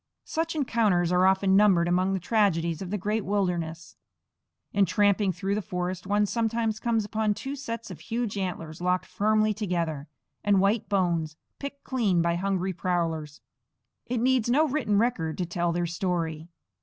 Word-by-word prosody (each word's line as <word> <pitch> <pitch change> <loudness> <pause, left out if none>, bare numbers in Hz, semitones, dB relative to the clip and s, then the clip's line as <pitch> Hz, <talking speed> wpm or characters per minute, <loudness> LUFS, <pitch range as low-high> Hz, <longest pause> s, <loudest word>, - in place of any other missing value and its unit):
Such 325 0 -2
encounters 215 - +2
are 180 +1 +4
often 190 0 +3
numbered 195 -4 +5
among 185 +2 +2
the 190 - 0
tragedies 175 -5 +1
of 185 - -5
the 210 - -1
great 210 +3 -1
wilderness. 175 -5 -2 0.8
In 200 -1 +3
tramping 200 +1 +2
through 190 +3 -2
the 210 - 0
forest 180 0 -4
one 205 +1 +2
sometimes 225 0 -1
comes 225 -3 0
upon 215 0 0
two 275 +5 -5
sets 230 -4 -6
of - - -9
huge 230 -2 -3
antlers 175 -4 -4
locked 180 0 +1
firmly 215 +1 +2
together, 170 -8 -2 0.4
and 200 -1 +4
white 200 +3 +1
bones, 170 -5 0 0.2
picked 280 0 -7
clean 220 -9 +1
by 170 0 +2
hungry 190 +1 -1
prowlers. 165 -4 -2 0.7
It 245 - -1
needs 250 -1 +2
no 300 +6 +4
written 260 -8 0
record 200 -9 0
to 180 - -1
tell 175 0 -1
their 175 +1 0
story. 165 -2 -2
195 Hz, 165 wpm, -27 LUFS, 175-220 Hz, 0.8 s, numbered